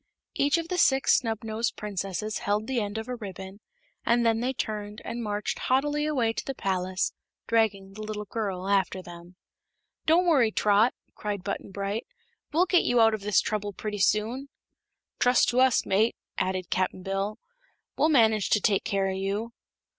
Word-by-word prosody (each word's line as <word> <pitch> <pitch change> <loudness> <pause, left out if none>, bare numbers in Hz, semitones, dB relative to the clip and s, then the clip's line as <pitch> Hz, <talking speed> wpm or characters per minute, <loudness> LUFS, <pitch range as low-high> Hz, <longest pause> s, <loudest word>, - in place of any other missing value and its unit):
Each 285 +4 +2
of 330 -1 -3
the 360 - -1
Six 270 -4 +4
Snubnosed 225 -1 -2
Princesses 205 0 -3
held 205 +1 0
the 255 -2 -1
end 205 +1 -4
of 220 - -5
a 250 - -3
ribbon, 195 -3 -8 0.4
and 235 0 +2
then 225 -1 +3
they 250 +2 0
turned 210 -4 -4
and 235 - -4
marched 210 -2 -2
haughtily 295 +3 +1
away 245 -7 +1
to - - -4
the 270 - -5
palace, 185 -2 -1 0.3
dragging 205 -4 +1
the 215 - -9
little 215 -1 -5
girl 195 -4 -3
after 190 -2 +1
them. 175 +1 -12 0.7
"Don't 335 +3 +5
worry, 270 -10 +4
Trot," 210 +3 +3 0.2
cried 205 -3 -4
Button 200 - -4
Bright; 200 +3 -3 0.4
"we'll 340 +4 +3
get 360 -1 +4
you 245 - +2
out 225 -1 +6
of 215 - -3
this 205 -1 +3
trouble 205 -1 -3
pretty 210 +1 -5
soon." 225 +8 +1 0.7
"Trust 245 0 +4
to 245 - +1
us, 260 -2 +4
mate," 215 +4 +2 0.2
added 185 -1 -2
Cap'n 185 0 -1
Bill; 195 +3 -2 0.6
"we'll 310 - +3
manage 220 -8 +4
to 210 - +4
take 200 -1 +2
care 195 -1 0
o' 190 - -1
you." 200 +4 -3
215 Hz, 175 wpm, -27 LUFS, 195-240 Hz, 0.7 s, out